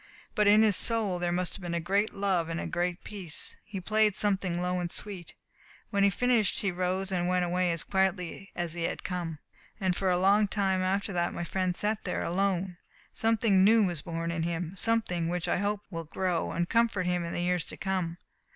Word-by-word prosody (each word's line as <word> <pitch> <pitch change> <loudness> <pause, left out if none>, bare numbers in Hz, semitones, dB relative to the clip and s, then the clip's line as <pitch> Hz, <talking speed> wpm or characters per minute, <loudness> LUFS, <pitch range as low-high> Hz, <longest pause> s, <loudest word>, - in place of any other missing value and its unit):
But 210 -1 +2
in 210 +2 +7
his 210 -3 +4
soul 215 -6 +5
there 175 0 -1
must 180 0 -1
have 200 - -6
been 175 -1 -3
a - - 0
great 200 +5 0
love 190 -4 0
and 165 +1 -3
a - - -4
great 175 0 -2
peace. 190 -7 -5
He 205 -2 -6
played 215 +2 +2
something 190 -4 0
low 180 0 -1
and 175 -1 -2
sweet. 190 -2 -6 0.6
When 200 - +1
he 200 - +6
had 190 - -7
finished 245 -5 +2
he 195 - 0
rose 185 +2 -2
and 175 -1 0
went 180 0 +1
away 180 0 +1
as 165 -2 -1
quietly 190 0 -1
as 175 -2 -2
he 170 - -5
had - - -3
come, 175 -4 -4 0.4
and 185 -3 +1
for 190 0 0
a 180 - +3
long 200 +3 +4
time 195 -2 0
after 195 +2 -1
that 175 -1 -1
my - - -3
friend 185 +1 -1
sat 210 +2 -1
there 180 - -2
alone. 185 0 -1 0.4
Something 225 -4 +3
new 220 +2 +6
was 175 -6 -1
born 165 +1 -3
in 170 -1 -2
him, 170 +1 -2
something 195 -6 +1
which 175 -1 -2
I - - +1
hope 205 +2 -1
will 165 -2 -5
grow 175 +2 -1
and 170 0 -1
comfort 230 -5 +1
him 180 -1 0
in 170 - -4
the 175 - -2
years 180 -1 +1
to - - -9
come. 185 -3 -2
185 Hz, 220 wpm, -29 LUFS, 175-200 Hz, 0.6 s, in